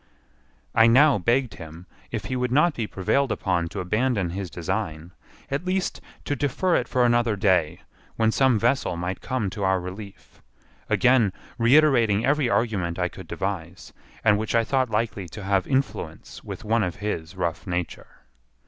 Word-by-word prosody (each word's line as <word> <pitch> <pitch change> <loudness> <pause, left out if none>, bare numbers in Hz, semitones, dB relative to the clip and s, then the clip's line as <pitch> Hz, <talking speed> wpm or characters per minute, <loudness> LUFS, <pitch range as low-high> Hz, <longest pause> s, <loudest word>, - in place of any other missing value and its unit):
I 115 - +6
now 135 +1 +5
begged 120 +4 +1
him, 80 +1 -11 0.2
if 110 -2 -4
he 130 - -3
would 125 -1 -1
not 150 +5 +4
be 115 -5 -3
prevailed 120 +8 0
upon 90 -3 0
to 85 - -5
abandon 105 -1 0
his 95 0 -4
design, 85 0 -4 0.4
at 140 +4 -1
least 185 0 -2 0.2
to 145 - -1
defer 145 +7 0
it - - 0
for 125 -2 +2
another 120 -2 +2
day, 90 -5 +1 0.3
when 110 0 +2
some 130 -1 +3
vessel 115 -6 0
might 90 +2 -4
come 125 -7 -2
to 100 - -5
our 95 0 +2
relief; 95 +3 -10 0.5
again 125 -5 +4 0.3
reiterating 120 -4 +4
every 145 -2 +2
argument 95 -9 0
I 90 -1 0
could - - -11
devise, 95 -2 -5 0.3
and 105 -2 +4
which 110 +1 -2
I 115 - +4
thought 130 +1 0
likely 105 -4 -2
to 105 - -9
have 100 -1 +1
influence 110 - -3
with - - -8
one 115 +1 +1
of 90 -4 -2
his 100 -5 -4
rough 85 +1 -3
nature. 90 -1 -4
105 Hz, 165 wpm, -24 LUFS, 90-125 Hz, 0.5 s, I